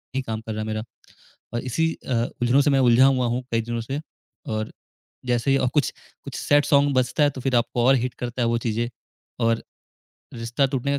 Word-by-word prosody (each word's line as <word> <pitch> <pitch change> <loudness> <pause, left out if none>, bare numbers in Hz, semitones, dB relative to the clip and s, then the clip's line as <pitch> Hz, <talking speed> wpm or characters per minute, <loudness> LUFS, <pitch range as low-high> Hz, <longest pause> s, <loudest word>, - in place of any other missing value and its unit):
ही 135 - +1
काम 110 -3 -4
कर 110 -1 -5
रहा 110 - -3
है 110 - -4
मेरा 110 0 -2 0.7
और 120 - 0
इसी 160 +6 0 0.2
अ, 130 - +1 0.3
उलझनों 125 +4 +4
से 145 - +3
मैं 135 -1 +3
उलझा 130 +3 +7
हुआ 130 -2 +2
हूँ 120 +2 -1
कई 115 - +2
दिनों 120 0 -3
से 135 +5 -4 0.5
और 110 0 -3 0.5
जैसे 120 +2 +1
ही 135 - +4
अ, 130 - +1
कुछ 150 - +1 0.3
कुछ 140 - -8
सैड 145 0 +3
सॉन्ग 145 -1 +4
बजता 130 +3 +2
है 145 - +5
तो 130 -2 -8
फिर 130 -1 0
आपको 120 0 +1
और 135 +1 +6
हिट 125 0 -1
करता 120 +1 -3
है 115 - +2
वो 115 0 +2
चीज़ें 115 +2 -1 0.6
और 115 0 +1 0.7
रिश्ता 120 +4 0
टूटने 135 +1 -1
125 Hz, 220 wpm, -24 LUFS, 115-135 Hz, 0.7 s, उलझा